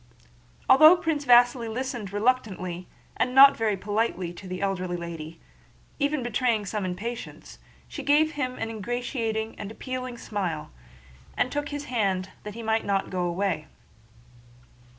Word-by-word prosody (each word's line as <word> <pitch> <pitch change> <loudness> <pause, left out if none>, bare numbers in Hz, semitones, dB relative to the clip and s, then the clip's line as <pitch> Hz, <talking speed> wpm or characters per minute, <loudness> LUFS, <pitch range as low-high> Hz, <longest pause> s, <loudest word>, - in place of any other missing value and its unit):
Although 310 +6 +8
Prince 320 -4 -2
Vasíli 240 -1 +5
listened 240 -4 -4
reluctantly 200 -6 -1 0.3
and 250 0 0
not 275 +1 +9
very 215 -3 0
politely 205 -3 -1
to 185 +2 -11
the 185 0 -5
elderly 185 -2 -2
lady, 165 -1 -7 0.6
even 285 -2 0
betraying 235 -2 0
some 205 0 -3
impatience, 215 +7 -6 0.3
she 290 - -7
gave 295 +3 +3
him 255 -4 -3
an 225 0 -3
ingratiating 225 0 -3
and 200 - -5
appealing 255 +2 -6
smile, 185 -9 -4 0.7
and 255 - +1
took 290 0 -2
his 290 0 -5
hand 195 -7 -1
that 210 0 -8
he 230 - -7
might 220 0 +1
not 195 -1 -1
go 180 -1 -1
away. 175 -3 -1
220 Hz, 140 wpm, -26 LUFS, 190-255 Hz, 0.7 s, not